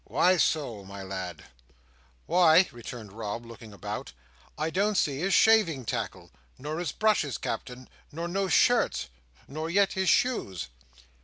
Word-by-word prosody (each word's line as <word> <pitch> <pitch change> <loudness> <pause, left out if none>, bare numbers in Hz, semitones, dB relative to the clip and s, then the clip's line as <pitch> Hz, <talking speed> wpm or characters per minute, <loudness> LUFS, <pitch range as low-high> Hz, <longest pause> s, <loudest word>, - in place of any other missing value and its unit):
"Why 185 0 +3
so, 135 - 0
my 100 0 -9
lad?" 95 -1 -6 0.8
"Why," 175 +1 +5
returned 115 -3 -9
Rob, 115 +1 -5
looking 115 -1 -12
about, 105 +1 -6 0.4
"I 155 +1 -1
don't 205 +4 +1
see 140 -5 +1
his 190 +4 +1
shaving 180 - +4
tackle. - - -4 0.3
Nor 150 +4 -5
his 175 -5 -2
brushes, 210 - +1
Captain. 125 +3 -5 0.2
Nor 165 +3 -4
no 195 +2 -1
shirts. 235 - +2 0.4
Nor 155 +4 -5
yet 195 +2 +3
his 190 -1 +1
shoes." 95 - +1
150 Hz, 140 wpm, -28 LUFS, 110-185 Hz, 0.8 s, Why